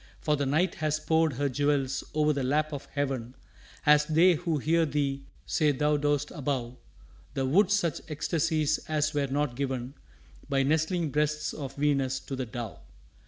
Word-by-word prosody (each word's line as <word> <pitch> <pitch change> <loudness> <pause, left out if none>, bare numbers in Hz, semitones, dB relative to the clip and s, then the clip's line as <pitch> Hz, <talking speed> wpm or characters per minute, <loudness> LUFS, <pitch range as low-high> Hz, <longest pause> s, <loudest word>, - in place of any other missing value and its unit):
For 150 -2 +1
the 140 -1 -1
Night 160 +6 +2
Has 155 0 +1
poured 160 -1 +2
her 140 +3 0
jewels 140 0 0
o'er 150 0 +3
the 140 - -2
lap 150 +4 0
of 140 - -5
heaven 135 -4 -3 0.5
As 150 0 +6
they 170 +3 +5
who 165 -1 -1
hear 165 +4 +2
thee 140 -2 -1 0.2
say 155 -3 +2
thou 150 +2 +1
dost 145 0 0
above 130 -5 -3 0.6
The 135 - 0
wood 180 +9 +4
such 190 -7 +1
ecstasies 155 0 0
as 155 0 +1
were 145 -1 0
not 140 -2 -1
given 130 -1 -3 0.6
By 135 -1 +2
nestling 160 +2 +1
breasts 150 +1 0
of 135 -2 -6
Venus 140 -2 +1
to 135 - -6
the 130 -1 -4
dove. 115 -2 -6
145 Hz, 165 wpm, -28 LUFS, 135-155 Hz, 0.6 s, As